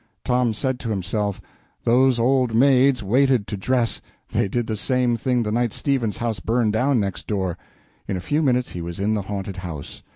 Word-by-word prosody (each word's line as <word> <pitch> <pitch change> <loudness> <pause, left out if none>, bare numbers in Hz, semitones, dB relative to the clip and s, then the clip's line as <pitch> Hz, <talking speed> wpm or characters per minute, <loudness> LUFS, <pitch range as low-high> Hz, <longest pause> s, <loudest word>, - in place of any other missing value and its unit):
Tom 125 -2 +2
said 130 +3 -2
to 115 - -5
himself, 100 0 -2 0.4
"Those 125 +1 +4
old 125 -1 +2
maids 130 -1 +4
waited 125 +1 +3
to 105 - -4
dress 120 +4 0 0.3
they - - +1
did 120 +4 -1
the 110 - -2
same 125 +2 +1
thing 125 +1 0
the 105 - -2
night 120 0 0
Stevens's 130 -7 0
house 115 -2 -2
burned 115 -2 +1
down 125 +3 +2
next 100 -3 -3
door." 95 -5 -1 0.5
In 95 - -2
a - - -4
few 145 - 0
minutes 125 -4 +1
he 90 - -5
was 85 0 -5
in 105 +2 +1
the 105 - 0
haunted 100 -1 -5
house. 85 -6 -7
115 Hz, 195 wpm, -23 LUFS, 100-125 Hz, 0.5 s, Those